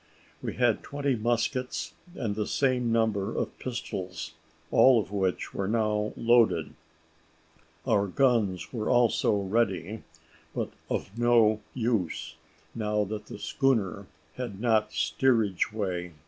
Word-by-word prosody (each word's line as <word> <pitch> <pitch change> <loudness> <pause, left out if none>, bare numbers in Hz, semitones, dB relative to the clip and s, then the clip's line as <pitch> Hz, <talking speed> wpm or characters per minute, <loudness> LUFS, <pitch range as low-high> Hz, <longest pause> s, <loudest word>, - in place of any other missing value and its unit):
We - - -4
had 120 -3 +2
twenty 140 -2 -1
muskets, 120 +3 -1 0.2
and 110 -5 -2
the 105 0 -2
same 125 -3 +1
number 110 -4 +1
of - - -2
pistols, 95 -8 -5 0.4
all 130 -3 +6
of 100 - -4
which 95 -3 -1
were 95 - -2
now 105 -1 0
loaded. 120 -1 +3 1.1
Our 100 0 +2
guns 115 -5 +1
were 110 -3 -2
also 120 -3 +3
ready, 100 0 -1 0.5
but - - -2 0.2
of 95 - -3
no 115 -3 +4 0.2
use, 110 -8 -1 0.4
now 105 -1 0
that 105 +1 -5
the - - -8
schooner 115 - 0 0.3
had 120 -6 -5
not 110 -5 +2
steerage 105 +5 +1
way. 90 -5 -3
110 Hz, 120 wpm, -28 LUFS, 100-120 Hz, 1.1 s, all